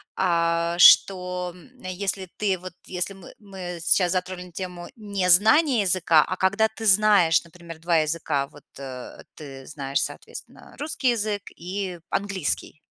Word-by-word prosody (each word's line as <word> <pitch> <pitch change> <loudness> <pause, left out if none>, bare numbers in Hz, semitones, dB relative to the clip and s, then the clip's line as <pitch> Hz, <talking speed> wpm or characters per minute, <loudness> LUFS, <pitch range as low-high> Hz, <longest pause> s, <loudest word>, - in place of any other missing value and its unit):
а, 170 -1 +1
что, 180 -1 +5
м, 180 - -17
если 190 +1 -3
ты, 195 -3 0
вот, 185 0 -9
если 180 +2 -3
мы 190 -2 -14
мы 190 -4 -8
сейчас 175 +1 +3
затронули 180 -1 -4
тему 180 0 -7
незнания 215 - +3
языка, 175 -4 +3
а 185 - -3
когда 200 +4 +2
ты 220 0 -8
знаешь, 200 -5 +5
например, 170 -1 -12
2 170 0 +1
языка, 155 -3 -1
вот, 145 0 -17 0.2
э, 130 -2 -9
ты 135 -3 -10
знаешь, 140 -2 -2
соответственно, - - -8
русский 290 -3 -1
язык 210 -3 -2
и 180 0 -5
английский, 190 -6 -3
180 Hz, 140 wpm, -24 LUFS, 170-200 Hz, 0.2 s, что